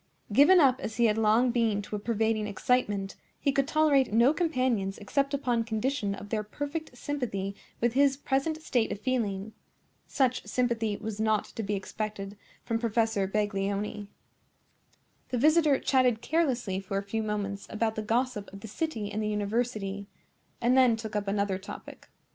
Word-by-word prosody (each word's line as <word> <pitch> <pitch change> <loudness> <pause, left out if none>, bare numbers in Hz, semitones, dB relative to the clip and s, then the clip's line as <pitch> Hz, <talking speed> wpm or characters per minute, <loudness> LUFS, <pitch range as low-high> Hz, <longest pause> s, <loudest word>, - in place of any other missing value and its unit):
Given 295 - +7
up 260 -4 +4
as 220 - -5
he 235 - +4
had 220 0 +2
long 225 +3 +4
been 225 -4 +1
to 210 - -5
a - - -3
pervading 220 0 0
excitement, 205 -3 0 0.2
he 280 - +1
could 275 0 +1
tolerate 300 -5 +3
no 235 +6 +5
companions 255 - 0
except 275 +7 -1
upon 245 -5 0
condition 220 -1 -1
of 205 - -10
their 215 -1 0
perfect 290 +6 -5
sympathy 220 -9 -3 0.2
with 235 0 +1
his 275 0 +3
present 285 +3 -1
state 240 -7 +1
of - - -4
feeling. 215 -4 -2 0.5
Such 255 -2 +1
sympathy 230 -4 0
was 220 -1 -6
not 220 -1 +2
to - - -4
be 205 -1 -2
expected 200 0 -5 0.3
from 225 0 -1
Professor 225 -3 +1
Baglioni. 205 0 -2 1.2
The 250 - -1
visitor 305 +1 +4
chatted 250 -4 +2
carelessly 250 - 0
for 195 0 -4
a 200 - -1
few 220 +3 -2
moments 205 -2 -3
about 220 0 0
the 220 - -3
gossip 230 -1 -1
of 195 0 -10
the 220 - -7
city 220 -4 -3
and 215 +1 -2
the 215 - -1
university, 210 -1 -2 0.5
and 245 +2 +3
then 255 -3 +5
took 220 -1 -7
up 205 -1 -1
another 200 -1 0
topic. 200 - -10
225 Hz, 165 wpm, -29 LUFS, 205-255 Hz, 1.2 s, Given